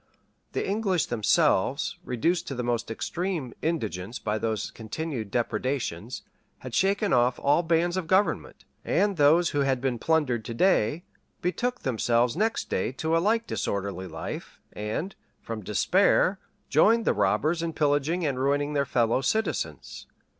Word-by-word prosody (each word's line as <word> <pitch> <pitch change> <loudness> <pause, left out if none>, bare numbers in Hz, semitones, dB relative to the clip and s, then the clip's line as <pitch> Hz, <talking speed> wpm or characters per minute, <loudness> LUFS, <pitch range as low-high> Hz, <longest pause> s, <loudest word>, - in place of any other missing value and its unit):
The - - -1
English 195 - +1
themselves, 110 -4 +1
reduced 165 +9 0
to 135 - -4
the 125 - -3
most 120 -1 -1
extreme 165 - -3
indigence 115 - -2
by 105 +1 -2
those 110 -1 -2
continued 115 0 -5
depredations, 120 -2 -2 0.3
had 130 -2 -9
shaken 200 - +2
off 125 0 +3
all 145 +4 +3
bands 170 +1 +1
of 180 -3 -3
government; 190 +4 0 0.2
and 205 -1 +1
those 160 +3 +4
who 145 - -1
had 135 -2 +1
been 125 -2 -1
plundered 145 -8 +1
to 115 - -5
day, 165 - +2 0.4
betook 245 +8 -1
themselves 120 0 +1
next 220 +5 0
day 95 - -1
to 160 +4 -1
a - - +4
like 225 +5 +1
disorderly 100 - -3
life, 80 -2 -7
and, 110 - -3 0.3
from 115 -1 -6
despair, 185 - +2 0.3
joined 230 +1 +4
the - - +3
robbers 165 +2 +1
in 170 -1 -2
pillaging 150 +3 +1
and 135 -3 -1
ruining 145 +2 +1
their 140 -1 +1
fellow 120 +1 +2
citizens. 135 - -2
145 Hz, 145 wpm, -27 LUFS, 115-175 Hz, 0.4 s, those